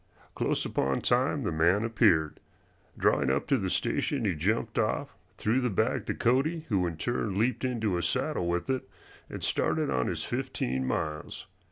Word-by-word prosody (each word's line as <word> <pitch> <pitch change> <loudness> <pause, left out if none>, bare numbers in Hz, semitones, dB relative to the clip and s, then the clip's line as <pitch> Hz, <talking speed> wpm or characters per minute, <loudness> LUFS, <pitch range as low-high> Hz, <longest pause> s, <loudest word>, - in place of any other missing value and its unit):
Close - - 0
upon 70 0 0
time - - +1
the - - -1
man 85 +6 +3
appeared. 100 -10 +2 0.6
Drawing 65 - +2
up 65 +1 +1
to 140 - +2
the 95 -2 -1
station 130 +6 0
he 95 - +2
jumped 95 +9 -1
off, - - -1 0.2
threw 115 +5 +1
the 125 - +1
bag 95 - 0
to - - -1
Cody, 155 +7 +1
who 95 -5 +2
in 85 -2 -5
turn 110 -1 -2
leaped 120 +6 +1
into 115 -6 0
his 85 -1 0
saddle 85 - -1
with 85 0 -1
it 130 -6 -2 0.4
and - - -7
started - - +1
on 65 -1 +1
his - - -2
fifteen 65 +1 -2
miles. 75 +2 -3
100 Hz, 175 wpm, -29 LUFS, 80-120 Hz, 0.6 s, man